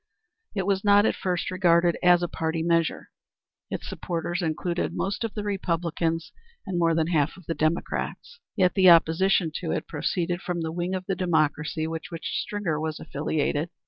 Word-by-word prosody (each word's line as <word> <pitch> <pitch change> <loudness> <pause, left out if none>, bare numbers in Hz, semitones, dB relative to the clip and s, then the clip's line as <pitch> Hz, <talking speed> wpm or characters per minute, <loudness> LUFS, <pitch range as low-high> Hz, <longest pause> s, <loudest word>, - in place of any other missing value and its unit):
It 195 -2 -1
was 195 -1 +1
not 205 0 +5
at - - +3
first 180 -1 -2
regarded 175 -2 +3
as 175 -1 +5
a - - +1
party 160 0 -2
measure. 165 -1 0 0.6
Its - - -5
supporters 175 +1 -3
included 170 +2 -2
most 200 +4 -2
of 225 - -4
the 210 - -3
Republicans 170 -4 -1 0.3
and 185 -3 -2
more 165 -1 +3
than 160 -1 +2
half 155 -3 0
of 185 - -15
the 165 - -2
Democrats. 165 - -2 0.2
Yet 185 -4 +3
the 185 -2 +6
opposition 170 +1 +4
to 170 - -5
it - - -2
proceeded 175 +3 -2
from 175 -3 -3
the 160 -1 -2
wing 175 +2 -2
of 185 0 -4
the 195 - -1
Democracy 155 -3 0
with 160 0 -4
which 165 -1 -5
Stringer 190 -7 -2
was 155 -1 -3
affiliated. 150 +2 -1
170 Hz, 175 wpm, -26 LUFS, 160-185 Hz, 0.6 s, the